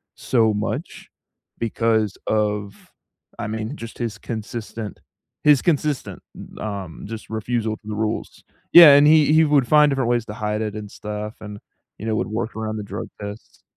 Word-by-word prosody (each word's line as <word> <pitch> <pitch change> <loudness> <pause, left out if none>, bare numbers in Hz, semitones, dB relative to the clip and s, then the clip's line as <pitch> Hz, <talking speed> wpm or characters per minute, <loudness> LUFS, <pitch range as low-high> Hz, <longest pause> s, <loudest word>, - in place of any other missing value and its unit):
so 110 -4 +2
much 105 - -4 0.5
because 110 -2 0
of, 105 -1 -2 0.5
I - - -3
mean, 110 +5 -4
just 115 0 -9
his 115 -2 -3
consistent 110 -1 -6 0.4
his 150 -3 +6
consistent, 150 -4 -1
u - - -11
um, 100 -5 -6
just 110 +1 -8
refusal 110 0 -2
to 105 - -19
the 105 - -4
rules. 110 +1 -3 0.3
Yeah, 165 -4 +11
and 145 +1 +6
he 155 -1 +5
he 160 0 +6
would 145 -5 +3
find 150 -1 +6
different 135 -3 0
ways 120 -2 +1
to 105 - -6
hide 105 0 -2
it 105 -1 -3
and 105 -1 -7
stuff 105 +1 -6
and, 105 -1 -8 0.4
you 110 - -7
know, 110 - 0
would - - -1
work 110 +1 -4
around 110 0 -3
the 105 - -4
drug 100 +1 -6
tests. 105 +1 -9
110 Hz, 175 wpm, -22 LUFS, 105-120 Hz, 0.5 s, Yeah